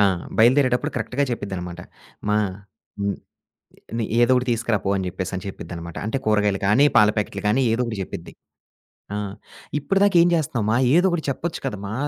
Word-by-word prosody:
ఆ! -, -, +6 dB, 0.4 s
బయలుదేరేటప్పుడు 125 Hz, +2 st, +4 dB
కరెక్ట్‌గా 140 Hz, +3 st, -1 dB
చెప్పిద్దనమాట. 90 Hz, -6 st, -5 dB, 0.5 s
మా 105 Hz, -, +3 dB, 0.6 s
హ్మ్. 100 Hz, 0 st, -1 dB, 1.0 s
"ఏదోకటి 125 Hz, +1 st, +4 dB
తీసుకురాపో" 110 Hz, -4 st, 0 dB
అని 95 Hz, -, -2 dB
జెప్పేసని 95 Hz, +1 st, -4 dB
చెప్పిద్దనమాట. 85 Hz, -3 st, -8 dB
అంటే 125 Hz, +5 st, -1 dB
కూరగాయలు 105 Hz, -2 st, +2 dB
కానీ, 115 Hz, +8 st, +5 dB
పాల 105 Hz, 0 st, +7 dB
ప్యాకెట్లు 105 Hz, 0 st, -2 dB
గానీ 130 Hz, +5 st, +3 dB
ఏదో 115 Hz, -, 0 dB
ఒకటి 110 Hz, -3 st, -4 dB
చెప్పిద్ది. -, -, -8 dB, 0.8 s
ఆ! -, -, -1 dB, 0.6 s
ఇప్పటిదాకా 195 Hz, +6 st, +2 dB
ఏం -, -, +4 dB
చేస్తున్నావు 130 Hz, -9 st, -1 dB
మా 120 Hz, -, +3 dB, 0.2 s
ఏదో 180 Hz, +2 st, +5 dB
ఒకటి 175 Hz, -3 st, -1 dB
చెప్పొచ్చు 165 Hz, +5 st, -3 dB
కదా 105 Hz, -, -2 dB
మా 105 Hz, -, -5 dB
110 Hz, 150 wpm, -23 LUFS, 100-135 Hz, 1.0 s, పాల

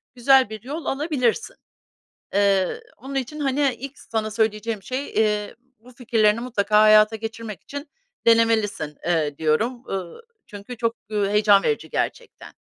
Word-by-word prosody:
güzel 260 Hz, -1 st, +4 dB
bir 215 Hz, -2 st, -8 dB
yol 295 Hz, +6 st, -6 dB
alabilirsin. 280 Hz, -, -1 dB, 0.8 s
Eee, 200 Hz, -, +2 dB, 0.2 s
onun 275 Hz, +1 st, -8 dB
için, 270 Hz, +3 st, -3 dB
hani, 275 Hz, -2 st, +1 dB
ilk 275 Hz, +2 st, -8 dB
sana 215 Hz, -1 st, -3 dB
söyleyeceğim 215 Hz, -1 st, -1 dB
şey, 260 Hz, +5 st, -4 dB
eee, 210 Hz, -1 st, 0 dB, 0.2 s
bu 245 Hz, +3 st, -17 dB
fikirlerini 225 Hz, -3 st, +2 dB
mutlaka 215 Hz, -3 st, +2 dB
hayata 215 Hz, 0 st, +6 dB
geçirmek 225 Hz, -1 st, -7 dB
için 285 Hz, +1 st, -8 dB, 0.4 s
denemelisin, 220 Hz, -9 st, +2 dB
eee, 155 Hz, -4 st, 0 dB
diyorum, 225 Hz, +11 st, 0 dB
ııı, 190 Hz, -, -5 dB, 0.3 s
çünkü 205 Hz, +4 st, -9 dB
çok, 230 Hz, 0 st, -1 dB, 0.2 s
ııı, 205 Hz, -2 st, 0 dB
heyecan 205 Hz, -1 st, +4 dB
verici 445 Hz, -, -1 dB
gerçekten. 480 Hz, -2 st, -4 dB
225 Hz, 135 wpm, -23 LUFS, 210-255 Hz, 0.8 s, hayata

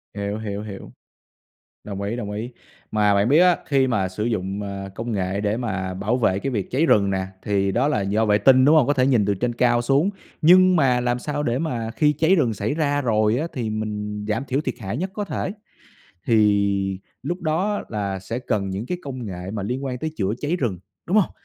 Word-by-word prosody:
Hiểu, 100 Hz, +1 st, -3 dB
hiểu, 105 Hz, -2 st, -4 dB
hiểu. 100 Hz, -2 st, -9 dB, 0.9 s
Đồng 100 Hz, -1 st, -6 dB
ý, 100 Hz, +3 st, -2 dB
đồng 105 Hz, -4 st, -4 dB
ý, 110 Hz, +4 st, -5 dB, 0.4 s
mà 105 Hz, -1 st, +3 dB
bạn 100 Hz, +3 st, +2 dB
biết 150 Hz, +5 st, +5 dB
á, 180 Hz, -1 st, +5 dB
khi 135 Hz, -2 st, +2 dB
mà 100 Hz, -6 st, +1 dB
sử 105 Hz, +3 st, -4 dB
dụng, 100 Hz, -3 st, -2 dB
à, 100 Hz, -1 st, -5 dB
công 115 Hz, +1 st, -4 dB
nghệ 100 Hz, -1 st, -1 dB
để 105 Hz, +1 st, 0 dB
mà 95 Hz, -6 st, -3 dB
bảo 105 Hz, +7 st, -1 dB
vệ 100 Hz, -5 st, +1 dB
cái 135 Hz, -, -2 dB
việc 105 Hz, -6 st, -3 dB
cháy 145 Hz, +6 st, +2 dB
rừng 100 Hz, -8 st, +4 dB
nè, 95 Hz, 0 st, -1 dB, 0.2 s
thì 100 Hz, -1 st, +1 dB
đó 125 Hz, +7 st, +1 dB
là 150 Hz, -9 st, +1 dB
do 105 Hz, +3 st, +1 dB
vệ 105 Hz, -1 st, +4 dB
tinh, 130 Hz, +4 st, +5 dB
đúng 150 Hz, +3 st, +6 dB
hông? 145 Hz, -5 st, +5 dB
Có 145 Hz, -, +3 dB
thể 130 Hz, -2 st, +2 dB
nhìn 120 Hz, -7 st, +3 dB
từ 100 Hz, -, +2 dB
trên 120 Hz, +4 st, -1 dB
cao 120 Hz, 0 st, +2 dB
xuống, 140 Hz, +9 st, +2 dB, 0.3 s
nhưng 185 Hz, +3 st, +6 dB
mà 130 Hz, -6 st, +3 dB
làm 120 Hz, 0 st, 0 dB
sao 145 Hz, +2 st, -3 dB
để 120 Hz, -1 st, 0 dB
mà 120 Hz, -8 st, -2 dB
khi 150 Hz, +4 st, +2 dB
cháy 165 Hz, +5 st, +3 dB
rừng 125 Hz, -9 st, +2 dB
xảy 105 Hz, +5 st, -2 dB
ra 145 Hz, -2 st, 0 dB
rồi 110 Hz, -2 st, +2 dB
á, 160 Hz, -, -1 dB
thì 120 Hz, -6 st, -3 dB
mình 105 Hz, -1 st, -4 dB
giảm 110 Hz, +6 st, -1 dB
thiểu 135 Hz, +2 st, -1 dB
thiệt -, -, -3 dB
hại 105 Hz, +1 st, -4 dB
nhất 185 Hz, +5 st, -2 dB
có 210 Hz, -, -3 dB
thể, 185 Hz, +2 st, -3 dB, 0.8 s
thì 100 Hz, -3 st, +2 dB, 0.2 s
lúc 175 Hz, +2 st, -3 dB
đó 180 Hz, +6 st, 0 dB
là 100 Hz, -3 st, -3 dB
sẽ 95 Hz, +6 st, -5 dB
cần 100 Hz, -6 st, -2 dB
những 100 Hz, +5 st, -4 dB
cái 180 Hz, +4 st, -3 dB
công 130 Hz, -4 st, -6 dB
nghệ 90 Hz, -1 st, -6 dB
mà 105 Hz, -3 st, -3 dB
liên 125 Hz, +6 st, -3 dB
quan 125 Hz, -2 st, -3 dB
tới 160 Hz, -, -3 dB
chữa 100 Hz, -1 st, 0 dB
cháy 155 Hz, +4 st, 0 dB
rừng, 115 Hz, -, -2 dB, 0.3 s
đúng 190 Hz, -, +1 dB
hông? 200 Hz, -, +3 dB
115 Hz, 230 wpm, -23 LUFS, 100-140 Hz, 0.9 s, đúng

